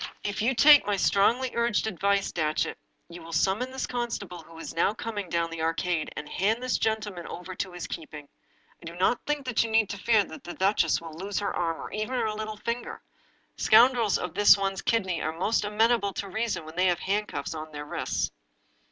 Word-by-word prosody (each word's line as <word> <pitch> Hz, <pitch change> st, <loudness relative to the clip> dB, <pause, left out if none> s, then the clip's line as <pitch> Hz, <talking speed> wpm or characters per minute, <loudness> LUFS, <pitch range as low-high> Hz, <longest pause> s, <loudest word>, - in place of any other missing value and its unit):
" -, -, -33 dB
If 205 Hz, -, -4 dB
you 245 Hz, +4 st, +2 dB
take 290 Hz, 0 st, +7 dB
my 205 Hz, -1 st, +1 dB
strongly 235 Hz, +7 st, +2 dB
urged 235 Hz, -2 st, +1 dB
advice, 200 Hz, -1 st, 0 dB
Datchet, 155 Hz, -, -1 dB, 0.3 s
you 170 Hz, 0 st, -10 dB
will 165 Hz, 0 st, -10 dB
summon 195 Hz, +9 st, +1 dB
this 265 Hz, 0 st, -3 dB
constable 230 Hz, -8 st, -4 dB
who 165 Hz, +1 st, -15 dB
is 165 Hz, -, -7 dB
now 185 Hz, +5 st, +1 dB
coming 210 Hz, -5 st, -5 dB
down 170 Hz, 0 st, -1 dB
the 165 Hz, -1 st, -5 dB
Ar 165 Hz, 0 st, +1 dB
cade, 175 Hz, -3 st, -1 dB
and 150 Hz, -, -5 dB
hand 220 Hz, +9 st, 0 dB
this 255 Hz, -, 0 dB
gentleman 210 Hz, -5 st, -2 dB
over 180 Hz, +2 st, -7 dB
to 185 Hz, +1 st, -4 dB
his 175 Hz, -1 st, -6 dB
keeping. 150 Hz, -2 st, -8 dB, 0.5 s
I -, -, -13 dB
do 170 Hz, +1 st, -7 dB
not 185 Hz, +7 st, +1 dB
think 295 Hz, -2 st, -1 dB
that 250 Hz, -3 st, +1 dB
you 230 Hz, -, -4 dB
need 220 Hz, -2 st, +2 dB
fear 210 Hz, +2 st, +3 dB
that 160 Hz, -, -11 dB
the 175 Hz, -, -7 dB
duchess 190 Hz, -4 st, +2 dB
will 165 Hz, -1 st, -9 dB
lose 195 Hz, +5 st, -5 dB
her 205 Hz, -, -1 dB
arm, 165 Hz, -2 st, -1 dB
or -, -, -7 dB
even 215 Hz, +5 st, -3 dB
her 220 Hz, -, 0 dB
little 215 Hz, 0 st, -5 dB
finger. 235 Hz, +3 st, -4 dB, 0.5 s
Scoundrels 235 Hz, -2 st, +5 dB
of 180 Hz, -2 st, -5 dB
this 205 Hz, +2 st, +7 dB
one's 195 Hz, -1 st, -2 dB
kidney 190 Hz, -7 st, 0 dB
are 160 Hz, +1 st, -3 dB
most 210 Hz, +6 st, +1 dB
amenable 210 Hz, -1 st, +2 dB
to 200 Hz, -, -4 dB
reason 220 Hz, -4 st, -2 dB
when 160 Hz, +1 st, -10 dB
they 185 Hz, +1 st, +3 dB
have 175 Hz, -1 st, +1 dB
hand 210 Hz, +2 st, 0 dB
cuffs 145 Hz, +1 st, -4 dB
on 155 Hz, 0 st, -7 dB
their 150 Hz, 0 st, -7 dB
wrists." -, -, -2 dB
200 Hz, 215 wpm, -27 LUFS, 170-225 Hz, 0.5 s, take